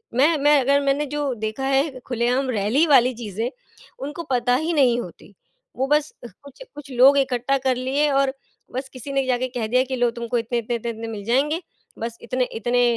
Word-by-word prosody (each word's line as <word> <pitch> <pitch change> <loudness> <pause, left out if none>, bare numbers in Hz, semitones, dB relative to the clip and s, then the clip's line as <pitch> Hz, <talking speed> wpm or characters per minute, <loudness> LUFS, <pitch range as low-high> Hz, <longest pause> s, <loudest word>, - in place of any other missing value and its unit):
मैं 300 +5 +4
मैं 290 0 +4
अगर 280 +2 +3
मैंने 280 +1 +1
जो 285 -3 -1
देखा 220 +5 -2
है 270 0 +1
खुलेआम 250 +2 0
रैली 230 +8 +2
वाली 255 -3 +5
चीजें 220 +1 -3 0.6
उनको 295 +4 -6
पता 245 0 +2
ही 315 +6 -1
नहीं 250 -5 +3
होती। - - -12 0.4
वो 265 +1 0
बस 300 +1 +1
अह 240 - -8
कुछ 280 - -15
कुछ 285 -2 -10
लोग 265 +3 +6
इकट्ठा 265 0 +1
कर 260 -1 0
लिए 270 +4 0
और 275 -1 +2 0.4
बस 265 +2 -5
किसी 255 +2 -7
ने 270 -1 +1
जाके 255 0 0
कह 225 -3 -1
दिया 250 +3 +3
कि 260 0 -4
लोग 245 -1 +1
तुमको 235 +1 -2
इतने, 235 +1 -2
इतने, 235 +1 -3
इतने, 235 0 -4
इतने 225 0 -7
मिल 210 -3 -6
जाएँगे, 285 - +1 0.4
बस 230 0 -5
इतने 250 +1 -1
इतने 245 +2 +2
255 Hz, 205 wpm, -22 LUFS, 240-275 Hz, 0.6 s, लोग